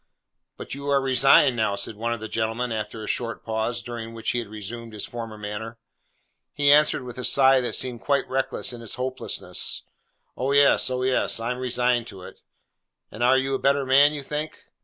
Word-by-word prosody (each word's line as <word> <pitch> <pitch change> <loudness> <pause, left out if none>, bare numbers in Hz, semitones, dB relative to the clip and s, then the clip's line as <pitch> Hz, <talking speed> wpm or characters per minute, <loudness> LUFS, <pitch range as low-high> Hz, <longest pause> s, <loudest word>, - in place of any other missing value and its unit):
'But - - -7
you 140 +1 -7
are 140 -1 +4
resigned 135 -1 +5
now!' 110 -3 0
said 100 +2 -2
one 115 +3 -3
of 120 - -2
the 110 - -6
gentlemen 115 +2 -2
after 110 0 -4
a - - -7
short 115 -2 -3
pause, 110 +2 -2
during 115 -1 -7
which 115 - -2
he 120 - -1
had 115 - -6
resumed 110 +2 -7
his 105 - -5
former 115 -2 -7
manner. 105 +2 -6 0.8
He 145 -1 +3
answered 150 -2 +4
with 125 0 -8
a - - -5
sigh 135 0 +5
that 125 - -1
seemed 125 -3 -2
quite 140 -1 0
reckless 130 -1 -2
in 120 - -9
its 115 - -4
hopelessness, 130 +1 -2 0.5
'Oh 135 +2 -1
yes, 140 -2 +5
oh 125 0 -2
yes! 130 -2 +1
I 115 +2 -2
am 125 - -4
resigned 125 -1 0
to 95 -5 -9
it.' - - -12 0.7
'And 110 - -9
are 125 +2 +5
a 135 0 -1
better 140 0 +2
man, 140 +3 +6
you 145 -2 -5
think? 150 +3 -5
120 Hz, 200 wpm, -24 LUFS, 115-135 Hz, 0.8 s, man